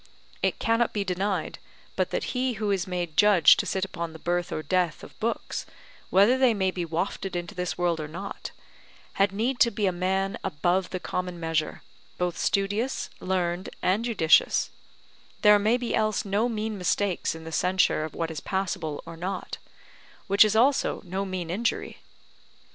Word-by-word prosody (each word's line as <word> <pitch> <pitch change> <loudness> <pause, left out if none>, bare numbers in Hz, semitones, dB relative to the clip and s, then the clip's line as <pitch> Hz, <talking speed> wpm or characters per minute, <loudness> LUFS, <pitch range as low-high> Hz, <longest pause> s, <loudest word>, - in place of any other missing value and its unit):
It - - +1
cannot 230 +1 +1
be 205 - 0
denied 195 +1 -2 0.4
but - - 0
that - - -2
he 255 0 0
who 210 -1 -1
is 190 -1 0
made 175 -3 -3
judge 205 -4 +7
to - - -1
sit 190 0 0
upon 170 -4 -5
the - - -9
birth 175 +1 -1
or 155 - -3
death 175 0 0
of - - -13
books, 230 +2 -2 0.5
whether 205 +8 +5
they 255 -4 +4
may 190 -2 +1
be 180 -1 -3
wafted 175 +3 -3
into 175 -1 -4
this 180 -1 -3
world 175 -2 +1
or 155 - -4
not, 185 +6 -7 0.7
had 195 0 +4
need 235 +6 -1
to 235 - +6
be 210 -2 -1
a 190 - +3
man 190 +2 -1
above 180 +2 0
the 185 - -4
common 180 -1 -4
measure, 165 -1 -2 0.3
both 180 -1 -1
studious, 205 +6 -1
learned, 180 -1 -1
and 195 +5 +2
judicious; 200 -9 +3 0.7
there 210 -1 +7
may 220 +4 +3
be 245 -1 -3
else 215 0 +1
no 205 +5 +1
mean 215 -2 -3
mistakes 185 -1 0
in 160 - -9
the 160 - -8
censure 180 -2 +2
of 155 - -6
what 165 -1 -2
is 160 - -5
passable 170 -6 -3
or 165 0 -8
not; 185 +3 -5 0.7
which 200 +1 +6
is 215 0 +1
also 265 +5 +2
no 190 +2 -3
mean 185 -3 -4
injury. 230 +6 -2
190 Hz, 175 wpm, -26 LUFS, 175-210 Hz, 0.7 s, judge